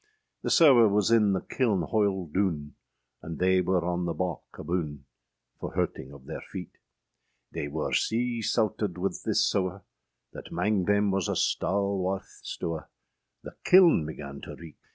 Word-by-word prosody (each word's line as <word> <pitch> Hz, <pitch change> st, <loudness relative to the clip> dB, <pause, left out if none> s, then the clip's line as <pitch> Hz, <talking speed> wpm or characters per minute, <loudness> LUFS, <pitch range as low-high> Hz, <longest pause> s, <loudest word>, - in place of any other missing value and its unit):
The -, -, -2 dB
sewe 130 Hz, -, +7 dB
was 105 Hz, +1 st, +2 dB
in 105 Hz, -4 st, +4 dB
the 95 Hz, -, -1 dB
kilne 110 Hz, -9 st, 0 dB
hoile 100 Hz, -1 st, 0 dB
doone, 85 Hz, -7 st, -1 dB, 0.5 s
And 80 Hz, 0 st, -7 dB
they 95 Hz, 0 st, +3 dB
wer 90 Hz, -1 st, 0 dB
on 90 Hz, 0 st, -1 dB
the 85 Hz, -, -2 dB
bawke 90 Hz, -4 st, -4 dB
aboone, 75 Hz, -4 st, -3 dB, 0.6 s
For -, -, -6 dB
hurting 65 Hz, -, -2 dB
of 70 Hz, -1 st, -12 dB
theyr -, -, -6 dB
feete; 90 Hz, -3 st, -8 dB, 0.7 s
They 75 Hz, -, -4 dB
wer 75 Hz, +2 st, -3 dB
sea 120 Hz, +1 st, 0 dB
sauted 110 Hz, -4 st, 0 dB
{131c} -, -, -12 dB
wyth 95 Hz, +2 st, -3 dB
this -, -, +2 dB
sewe, 95 Hz, 0 st, -1 dB, 0.5 s
That -, -, -9 dB
âmang 95 Hz, 0 st, 0 dB
thayme 100 Hz, 0 st, +3 dB
was 95 Hz, -2 st, 0 dB
a -, -, 0 dB
stalwarth 95 Hz, -1 st, -1 dB
stewe, 80 Hz, -3 st, -4 dB, 0.6 s
The -, -, -9 dB
kilne 180 Hz, -, +6 dB
began 70 Hz, -3 st, -8 dB
to -, -, -8 dB
reeke! 85 Hz, -3 st, -12 dB
95 Hz, 160 wpm, -28 LUFS, 85-105 Hz, 0.7 s, sewe